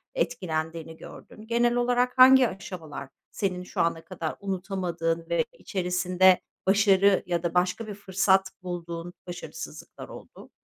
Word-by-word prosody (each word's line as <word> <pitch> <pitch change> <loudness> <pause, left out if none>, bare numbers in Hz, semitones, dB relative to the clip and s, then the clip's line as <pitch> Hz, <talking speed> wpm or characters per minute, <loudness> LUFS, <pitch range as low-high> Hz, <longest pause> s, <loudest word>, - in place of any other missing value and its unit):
etkilendiğini 165 - -3
gördün? 215 +5 -12
Genel 235 +1 +2
olarak 245 +1 +1
hangi 260 0 +8
aşamalar 180 -8 -8 0.2
senin 185 -3 -2
şu - - -3
ana 165 -1 -1
kadar 170 -4 -5
unutamadığın 180 -4 -2
ve 170 - +1
içerisinde 180 - +2 0.3
başarı 200 -1 +4
ya 175 -1 -1
da 170 - -1
başka 185 +5 0
bir 205 - -5
fırsat 190 -1 +1
bulduğun 175 -1 -6
başarısızlıklar 175 0 -8
oldu? - - -12
185 Hz, 125 wpm, -26 LUFS, 170-205 Hz, 0.3 s, hangi